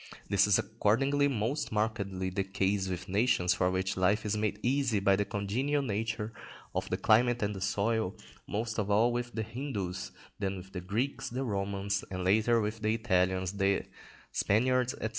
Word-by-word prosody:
This 100 +1 +4
is 105 - +5
accordingly 135 +7 +2
most 135 +3 -1
markedly 100 -4 -1
the 95 +1 -1
case 95 0 0
with 90 -2 -4
nations 95 -3 +2
for 90 0 +1
which 95 0 -1
life 100 +4 +2
is 105 0 0
made 105 -1 -1
easy 125 -4 +2
by 100 0 +4
the 100 +1 0
congenial 120 +9 -1
nature 110 -1 -2 0.4
of - - -2
the - - 0
climate 120 +1 +3
and 100 +1 0
the 95 - -6
soil, 105 0 0 0.3
most 110 +2 -2
of 105 -1 -1
all 110 +4 +4
with 120 0 -3
the 110 - -1
Hindus, 100 -7 -4 0.3
then 100 -1 -2
with 95 +1 -10
the 90 - -5
Greeks, 125 +8 -2
the 130 +3 -3
Romans, 100 -2 -1
and 95 -1 -4
later 110 +5 +3
with 105 +1 -2
the 110 +1 +1
Italians, 95 -4 +1
the 100 0 +1 0.5
Spaniards, 125 +5 +2
&c. 110 - -2
105 Hz, 180 wpm, -31 LUFS, 95-115 Hz, 0.5 s, is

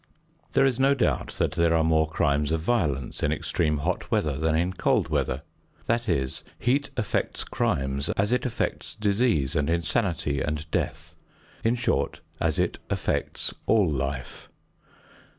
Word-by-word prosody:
There - - +5
is 130 -2 +1
no 135 +1 +4
doubt 125 - 0
that - - 0
there 85 -1 +2
are 80 - +3
more 80 -1 +3
crimes 75 -2 +1
of 80 - +1
violence 80 - 0
in - - +2
extreme 75 -3 0
hot 70 - -2
weather 75 -3 +1
than 80 +2 +1
in 90 +3 +1
cold - - +1
weather. 65 +3 0 0.4
That 115 0 0
is, 65 -1 -1
heat 140 +4 +1
affects 120 - -1
crimes 70 +1 -1
as 100 +3 +1
it 125 0 +2
affects 125 - -2
disease 100 - +1
and 75 +1 +1
insanity 85 - 0
and 75 0 -2
death; - - -2 0.5
in 115 +2 +3
short, 120 -1 0 0.2
as - - +1
it - - 0
affects - - -1
all 105 -4 +4
life. 70 -3 -3
80 Hz, 150 wpm, -26 LUFS, 70-115 Hz, 0.5 s, There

